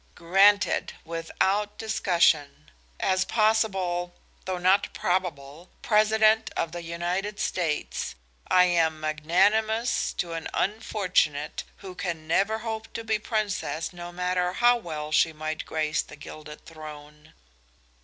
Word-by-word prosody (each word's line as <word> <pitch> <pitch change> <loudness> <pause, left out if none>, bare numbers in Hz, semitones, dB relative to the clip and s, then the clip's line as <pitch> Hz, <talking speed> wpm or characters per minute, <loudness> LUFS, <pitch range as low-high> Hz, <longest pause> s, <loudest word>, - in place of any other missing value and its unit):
"Granted, 195 +4 +3
without 190 +5 -1
discussion. 165 - +1 0.3
As 185 0 +2
possible, 190 -6 +1 0.3
though 185 -1 -2
not 185 +3 +3
probable, 170 -3 -2
President 215 0 +4
of 165 - -1
the 175 +1 -6
United 175 +5 -3
States, 165 -5 -2 0.3
I 180 - +6
am 165 -3 +2
magnanimous 195 +10 +1
to 170 -1 -3
an 165 -1 -4
unfortunate 185 -8 0 0.2
who 185 - -7
can 175 -4 -4
never 200 +6 +2
hope 220 0 -5
to 230 - -5
be 220 -1 0
princess, 205 -7 -2
no 175 0 -8
matter 180 0 -1
how 240 +3 +5
well 155 -8 -6
she 160 +1 +3
might 155 0 -5
grace 155 0 0
the - - -12
gilded 150 +1 -11
throne." 150 -1 -12
180 Hz, 120 wpm, -26 LUFS, 160-210 Hz, 0.3 s, I